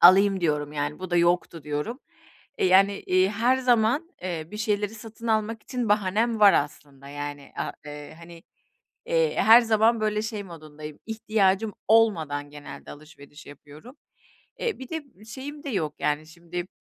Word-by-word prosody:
alayım" 195 +2 +7
diyorum, 150 -3 0
yani, 145 0 -3
"Bu 185 -1 -7
da 175 - +2
yoktu" 170 -2 +1
diyorum. 150 - -3 0.6
Eee, - - +3
yani, 195 +2 +4
iii, 185 +1 +3
her 235 +5 +2
zaman, 250 +4 +2
eee, 170 -3 -4
bir 210 - -7
şeyleri 210 -1 -1
satın 225 +1 -10
almak 220 0 0
için 250 -3 -3
bahanem 210 +3 +1
var 205 -2 +8
aslında, 140 -1 -3
yani. 145 0 -7
A - - -3
eee, 150 0 -9
hani, 170 0 -13 0.6
eee, 485 -1 +2
her 225 +3 +8
zaman 225 0 +3
böyle 215 0 0
şey 220 -2 -4
modundayım, 155 -3 -10
ihtiyacım 215 -2 +1
olmadan 160 -11 +2
genelde 145 0 -10
alışveriş 145 0 -14
yapıyorum. 150 - -13 0.6
Eee, 470 -2 -2
bir 260 - -9
de 275 - -8
şeyim 280 +6 -8
de 285 - -4
yok, 155 - -2
yani, 150 +1 0
şimdi 170 +2 -7
195 Hz, 155 wpm, -26 LUFS, 155-225 Hz, 0.6 s, var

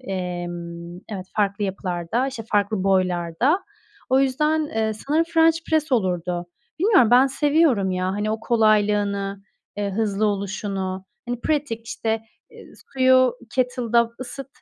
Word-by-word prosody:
emm, 175 -4 -5
evet, 190 -3 -6
farklı 205 0 +1
yapılarda, 190 +5 -2
işte, 255 -4 -5
farklı 205 -1 +1
boylarda. 185 - +1 0.5
O 260 +1 +4
yüzden, 300 +4 +1
eee, 220 -4 -1
sanırım 295 +9 0
french 330 -1 +3
press 310 -3 +1
olurdu. 180 -5 0 0.3
Bilmiyorum, 360 - +4
ben 255 +2 +7
seviyorum 280 - +2
ya. 185 0 -1
Hani, 210 +1 -1
o 220 0 -2
kolaylığını, 205 -3 +1 0.3
eee, 205 -1 -2
hızlı 215 0 0
oluşunu, 195 -2 -3 0.2
hani, 245 0 -3
pratik, 275 -7 -2
işte, 225 0 -2 0.7
suyu 260 -1 +5 0.2
kettle'da 240 -2 +1
ısıt, 270 +2 -7
215 Hz, 125 wpm, -23 LUFS, 190-260 Hz, 0.7 s, ben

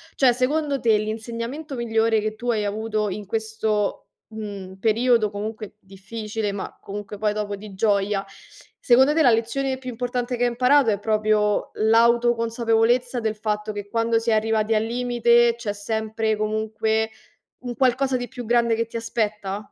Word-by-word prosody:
Cioè, 260 -3 +5
secondo 280 +2 0
te 225 -2 +3
l'insegnamento 230 +7 -5
migliore 225 -2 +1
che 215 0 -3
tu 240 +2 -2
hai 210 -2 0
avuto 215 0 -1
in 205 +2 -5
questo, 220 -1 -2 0.2
mhmm, 205 -4 -7
periodo 225 0 +2
comunque 215 0 -6
difficile, 210 +2 -5
ma 200 - -6
comunque 205 +1 -7
poi 210 0 0
dopo 205 -1 -3
di 200 0 -11
gioia, 200 0 +1 0.6
secondo 265 +4 +5
te 320 - +3
la 245 - +6
lezione 260 +4 0
più 255 -1 -7
importante 245 +1 -3
che 245 - 0
hai 245 - +3
imparato 250 0 +4
è 200 - -1
proprio 215 -1 +1
l'autoconsapevolezza 235 +1 +2
del 220 -1 -2
fatto 210 0 -2
che 205 -1 -7
quando 230 0 +1
si 230 +1 -2
è - - +4
arrivati 220 0 +1
al 215 - +2
limite 240 0 +3
c'è 215 -4 -3
sempre 220 +1 -2
comunque 220 +1 -1 0.5
un 245 -1 -5
qualcosa 260 +1 +2
di 245 0 -3
più 250 -2 -8
grande 235 -1 +3
che 230 0 -1
ti 230 - -8
aspetta? 210 -4 -2
225 Hz, 160 wpm, -23 LUFS, 215-240 Hz, 0.6 s, la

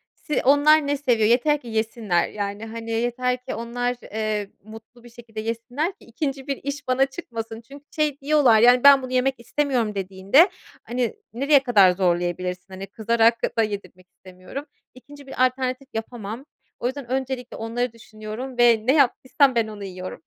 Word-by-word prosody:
se 300 - -2
onlar 290 +2 +5
ne 285 - 0
seviyor? 235 -6 +2
Yeter 295 +5 +3
ki 240 - -13
yesinler, 220 -5 -1
yani, 205 +1 -5
hani, 230 0 -7
yeter 245 +2 0
ki - - -4
onlar, 245 +1 -2
eee, 215 -2 -3
mutlu 225 +3 -14
bir 240 - -13
şekilde 230 -2 -10
yesinler 240 - -3
ki - - -19
2. 270 +2 -4
bir 275 -1 -2
iş 285 0 -5
bana 260 +1 +3
çıkmasın. 230 -6 -7
Çünkü 280 +4 -14
şey 300 -2 0
diyorlar, 275 -6 +4
yani, 245 +2 +5
"Ben 280 -1 +8
bunu 255 0 -7
yemek 260 +1 +2
istemiyorum." 240 -4 -1
dediğinde, 195 - +3 0.3
hani, 240 -2 -2 0.2
nereye 275 +3 +3
kadar 205 -8 +5
zorlayabilirsin? 180 0 -1
Hani, 195 +1 -7
kızarak 230 +2 +1
da 225 - +4
yedirmek 200 -3 -6
istemiyorum. 185 +10 -10 0.3
2. 280 +2 -14
bir 255 -1 +2
alternatif 255 +1 -2
yapamam. 225 +2 -6 0.3
O 240 - -1
yüzden 260 -2 -6
öncelikle 260 -2 -3
onları 230 +2 -3
düşünüyorum 230 +3 -8
ve 235 -2 +5
ne 260 - +4
yaptıysam 270 -1 +3
ben 225 -2 +2
onu 210 -2 -8
yiyorum. 185 -3 -7
240 Hz, 165 wpm, -23 LUFS, 220-270 Hz, 0.3 s, Ben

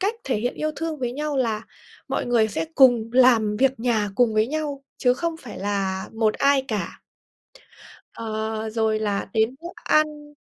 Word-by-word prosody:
cách 405 +4 0
thể 265 - 0
hiện 240 +4 -2
yêu 310 0 -2
thương 325 -2 -3
với 245 -2 -2
nhau 295 +1 -3
là 225 -4 0 0.5
mọi - - -2
người 230 -3 +3
sẽ 165 -5 -2
cùng 240 -4 +5
làm 235 -5 +4
việc 265 0 +1
nhà 225 -4 +1
cùng 235 -2 +2
với 215 +1 +3
nhau 290 -1 -3
chứ 250 -1 +3
không 335 +3 -3
phải 250 -9 -10
là 195 -1 -2
một 220 -1 +1
ai 280 -1 +3
cả. 210 -3 -4 1.1
Ờ, 220 0 -4
rồi 220 -1 +1
là 205 -2 -2
đến 220 +3 +1
bữa 340 - -7 0.2
ăn 300 -1 +1
240 Hz, 180 wpm, -23 LUFS, 220-280 Hz, 1.1 s, cùng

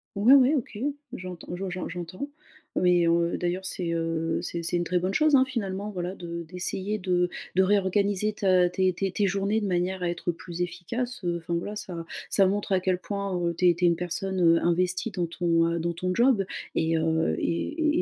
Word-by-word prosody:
Ouais, 215 +7 +6
ouais, 275 +2 +6
OK, 230 -6 -3 0.3
j'entends 180 -2 -7
je 190 +2 -4
j'en 180 0 -4
j'entends. 180 - -6 0.5
Mais, 175 -1 +4
heu, 170 0 +2
d'ailleurs, 180 +2 -2
c'est, 180 -2 -2
heu, 165 0 -1
c'est 170 - -3
c'est 170 +1 0
une 175 - 0
très 180 +1 0
bonne 185 +2 -1
chose, 305 +2 +4
hein, 260 -1 +5
finalement, 205 -5 -3
voilà 180 -2 -4
de 170 -2 -6
d'essayer 185 +5 -3
de 180 -2 +1 0.3
de 190 - +5
réorganiser 200 +1 +2
ta 185 -3 +3
tes 185 +1 +1
tes 195 +2 -2
tes 205 +2 +1
journées 200 +3 0
de - - -1
manière 180 +1 -1
à 175 - +1
être 175 0 -2
plus 170 +1 -7
efficace. 185 +8 -4
Heu, 175 -1 0
enfin, 170 0 -3
voilà, 205 +5 -3
ça 175 -5 -6 0.2
ça 195 - +4
montre 200 +2 -1
à 190 - +4
quel 185 -1 0
point, 200 0 -3
heu, 170 -1 -1
tu 180 - +4
es - - +5
tu 175 +1 +1
es - - +7
une 170 - +4
personne, 180 +2 -3
heu, 165 -1 +5
investie 180 +5 +1
dans 180 -3 -1
ton 165 -1 +1
heu, 170 0 -1
dans 170 +1 -1
ton 180 +2 -2
job. 235 -2 +3 0.3
Et 160 0 +2
heu, 160 0 +1
et 305 - 0
180 Hz, 215 wpm, -27 LUFS, 170-200 Hz, 0.5 s, es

